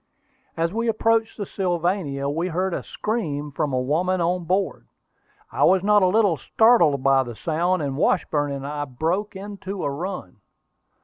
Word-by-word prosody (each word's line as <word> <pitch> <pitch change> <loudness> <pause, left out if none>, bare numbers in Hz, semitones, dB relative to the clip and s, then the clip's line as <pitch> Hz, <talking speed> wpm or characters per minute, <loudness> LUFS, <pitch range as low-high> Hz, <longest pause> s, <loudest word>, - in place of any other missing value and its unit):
As 165 +2 0
we 230 +1 -1
approached 225 0 +1
the 205 - -3
Sylvania, 175 -7 -1
we 160 +5 -1
heard 185 +2 -1
a - - -2
scream 150 -10 -3
from 145 +1 -2
a 130 - 0
woman 170 +8 0
on 175 +1 0
board. 190 +3 -1 0.6
I - - 0
was 190 0 +4
not 210 0 +4
a 185 - +4
little 200 -3 +3
startled 170 - +3
by 135 -1 +4
the 120 -3 -6
sound, 170 +5 0
and 140 -2 -2
Washburn 145 0 +1
and 140 -1 -5
I 145 0 -3
broke 165 +11 -2
into 195 -1 -6
a 140 - -1
run. 165 - -6
175 Hz, 170 wpm, -23 LUFS, 145-195 Hz, 0.6 s, was